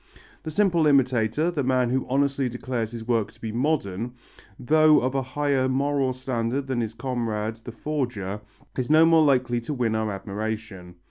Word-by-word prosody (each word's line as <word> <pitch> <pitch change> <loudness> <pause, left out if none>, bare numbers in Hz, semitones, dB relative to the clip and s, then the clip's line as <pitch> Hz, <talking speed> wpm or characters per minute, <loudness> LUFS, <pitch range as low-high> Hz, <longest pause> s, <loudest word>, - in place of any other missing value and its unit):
The - - -6
simple 170 -2 +2
imitator, 135 +2 +2
the 150 -5 -2
man 125 -1 +1
who 130 0 -1
honestly 140 0 +1
declares 120 -2 -3
his 115 -1 -8
work 115 -4 +1
to - - -23
be 110 - -5
modern, 120 -4 -1 0.4
though 155 +3 +5
of 130 +1 -1
a 135 - +1
higher 135 0 0
moral 135 0 +1
standard 130 +1 -2
than 130 -3 -1
his 110 -1 -4
comrade 115 -4 -3
the 115 +2 -9
forger, 115 -7 -3 0.3
is 130 0 -2
no 155 +1 +6
more 165 -1 +5
likely 125 -4 +2
to 145 +5 -4
win 120 -3 0
our 110 -1 -1
admiration. 100 -2 -5
125 Hz, 175 wpm, -25 LUFS, 115-140 Hz, 0.4 s, no